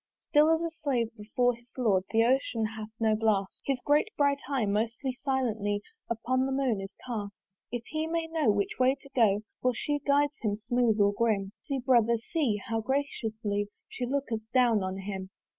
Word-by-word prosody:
"Still 300 Hz, +1 st, +3 dB
as 325 Hz, +1 st, +3 dB
a 335 Hz, -, -2 dB
Slave 255 Hz, -8 st, -1 dB
before 245 Hz, +3 st, +1 dB
his 240 Hz, +1 st, -17 dB
Lord, 200 Hz, -7 st, +2 dB
"The 225 Hz, +1 st, +4 dB
Ocean 240 Hz, -2 st, +2 dB
hath 215 Hz, -1 st, -5 dB
no 220 Hz, -1 st, +3 dB
blast: 210 Hz, -3 st, +1 dB, 0.2 s
"His 270 Hz, -2 st, +1 dB
great 295 Hz, +7 st, +4 dB
bright 285 Hz, -1 st, +3 dB
eye 265 Hz, -6 st, +1 dB
most 220 Hz, +3 st, 0 dB, 0.3 s
silently 220 Hz, -7 st, 0 dB, 0.3 s
"Up 230 Hz, -, -1 dB
to 255 Hz, +1 st, +2 dB
the 270 Hz, -, -1 dB
moon 265 Hz, -6 st, +1 dB
is 195 Hz, -, -8 dB
cast 210 Hz, -5 st, -4 dB, 0.4 s
"If 240 Hz, -1 st, -3 dB
he 310 Hz, +5 st, -2 dB
may 330 Hz, 0 st, -1 dB
know 320 Hz, -6 st, +1 dB
which 205 Hz, +2 st, 0 dB
way 260 Hz, +1 st, +4 dB
to 275 Hz, -, -15 dB
go, 210 Hz, -5 st, +4 dB, 0.2 s
"For 250 Hz, -1 st, +2 dB
she 290 Hz, +5 st, -1 dB
guides 290 Hz, +1 st, +2 dB
him 210 Hz, -3 st, 0 dB
smooth 225 Hz, 0 st, +1 dB
or 200 Hz, 0 st, +4 dB
grim. 205 Hz, -3 st, +1 dB
"See, 275 Hz, -, -3 dB
brother, 235 Hz, -3 st, +4 dB
see! 250 Hz, -1 st, 0 dB
how 225 Hz, 0 st, 0 dB
graciously 220 Hz, -6 st, -1 dB, 0.2 s
"She 245 Hz, -, -4 dB
looketh 260 Hz, -4 st, -1 dB
down 240 Hz, -4 st, +4 dB
on 185 Hz, 0 st, -3 dB
him." 190 Hz, -1 st, -5 dB
235 Hz, 190 wpm, -29 LUFS, 210-275 Hz, 0.4 s, The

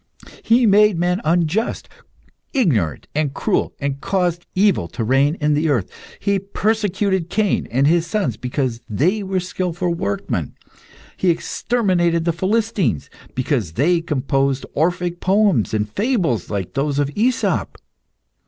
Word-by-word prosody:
He 235 Hz, +2 st, +3 dB
made 210 Hz, -2 st, +5 dB
men 180 Hz, +3 st, 0 dB
unjust, 175 Hz, +6 st, 0 dB, 0.7 s
ignorant, 125 Hz, -, +1 dB
and 145 Hz, -2 st, -1 dB
cruel, 210 Hz, -, 0 dB
and 140 Hz, -1 st, -3 dB
caused 175 Hz, -3 st, -1 dB
evil 190 Hz, -, +3 dB
to 115 Hz, -, -4 dB
reign 135 Hz, +6 st, +2 dB
in 150 Hz, -3 st, +1 dB
the 155 Hz, +2 st, +1 dB
earth. 120 Hz, -10 st, 0 dB, 0.3 s
He 200 Hz, -1 st, +1 dB
persecuted 200 Hz, -3 st, 0 dB
Cain 210 Hz, +1 st, 0 dB
and 135 Hz, +3 st, +2 dB
his 165 Hz, +2 st, +3 dB
sons 195 Hz, -, -1 dB
because 125 Hz, 0 st, -3 dB
they 175 Hz, -, +1 dB
were 190 Hz, -1 st, -1 dB
skilful 180 Hz, -1 st, -2 dB
workmen; 100 Hz, -11 st, -3 dB, 0.6 s
he 185 Hz, -, +1 dB
exterminated 175 Hz, -2 st, +1 dB
the 170 Hz, -, +1 dB
Philistines 190 Hz, -, 0 dB, 0.2 s
because 125 Hz, -, -1 dB
they 165 Hz, -, +2 dB
composed 135 Hz, -3 st, 0 dB
Orphic 175 Hz, +2 st, 0 dB
poems, 195 Hz, -, +2 dB
and 105 Hz, -1 st, 0 dB
fables 170 Hz, -, 0 dB
like 100 Hz, -3 st, -3 dB
those 140 Hz, 0 st, -1 dB
of 145 Hz, -1 st, +1 dB
AEsop. 240 Hz, +4 st, 0 dB
170 Hz, 135 wpm, -20 LUFS, 135-195 Hz, 0.7 s, made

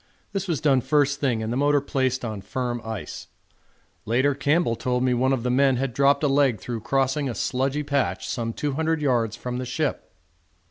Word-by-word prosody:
This 195 Hz, -1 st, -2 dB
was 165 Hz, -5 st, 0 dB
done 140 Hz, -4 st, +3 dB
first 145 Hz, 0 st, +2 dB
thing 120 Hz, -6 st, 0 dB
and 110 Hz, +2 st, -2 dB
the -, -, -1 dB
motor 145 Hz, +1 st, +3 dB
placed 130 Hz, -2 st, -1 dB
on 110 Hz, -3 st, -4 dB
firm 120 Hz, +3 st, -3 dB
ice. 110 Hz, -2 st, -6 dB, 0.8 s
Later 130 Hz, +6 st, +2 dB
Campbell 145 Hz, -1 st, +1 dB
told 125 Hz, +1 st, -1 dB
me 130 Hz, -1 st, +2 dB
one 130 Hz, +2 st, +2 dB
of 130 Hz, -4 st, 0 dB
the 125 Hz, -, 0 dB
men 135 Hz, +1 st, +4 dB
had 130 Hz, 0 st, -2 dB
dropped 140 Hz, +3 st, +3 dB
a -, -, +4 dB
leg 135 Hz, -5 st, +2 dB
through 115 Hz, +1 st, -5 dB
crossing 135 Hz, +3 st, 0 dB
a 120 Hz, -, -4 dB
sludgy 135 Hz, +7 st, -1 dB
patch 140 Hz, -2 st, -1 dB
some 115 Hz, -2 st, -2 dB
200 155 Hz, +5 st, -1 dB
yards 120 Hz, -7 st, +1 dB
from 125 Hz, 0 st, -5 dB
the -, -, -3 dB
ship. 135 Hz, +4 st, -2 dB
130 Hz, 195 wpm, -24 LUFS, 120-145 Hz, 0.8 s, men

